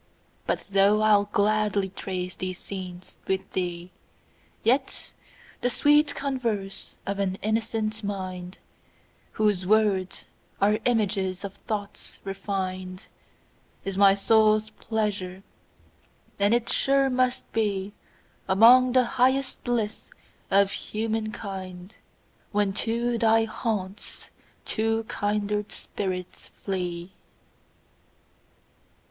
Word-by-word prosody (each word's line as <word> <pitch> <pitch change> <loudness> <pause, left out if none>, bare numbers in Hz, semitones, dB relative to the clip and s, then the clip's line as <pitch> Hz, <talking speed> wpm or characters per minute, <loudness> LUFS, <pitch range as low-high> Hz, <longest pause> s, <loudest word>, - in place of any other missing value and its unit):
But - - -1
though 200 +2 +4
I'll 205 -1 +5
gladly 205 -1 +2
trace 185 -1 -4
these 185 -1 -4
scenes 185 -2 -8
with 190 0 -1
thee, 175 -1 -3 0.7
Yet 260 +3 0 0.5
the 245 - +2
sweet 295 +3 +4
converse 230 -8 -3
of 200 0 -3
an 190 -1 0
innocent 220 0 -1
mind, 185 -2 -5 0.8
Whose 205 -4 +1
words 205 -3 +2 0.3
are 210 +2 +3
images 200 -5 +1
of 200 -1 -5
thoughts 205 -2 -5
refin'd, 185 -2 -4 0.8
Is 195 -1 -2
my 195 0 +6
soul's 215 +1 +3
pleasure; 200 -4 -3 1.0
and 205 +3 +4
it 240 -1 0
sure 275 0 +3
must 255 -1 +1
beAlmost 215 +3 +3
the 255 - +6 0.2
highest 260 +2 +2
bliss 225 -3 -2 0.4
of 200 0 +4
human 220 0 -2
kind, 190 -2 -7 0.6
When 205 -2 +1
to 235 +2 0
thy 225 0 +4
haunts 210 -3 -4 0.3
two 225 0 0
kindred 210 -1 -1
spirits 185 -3 -5 0.2
flee. 180 -2 -3
205 Hz, 95 wpm, -26 LUFS, 190-225 Hz, 1.0 s, my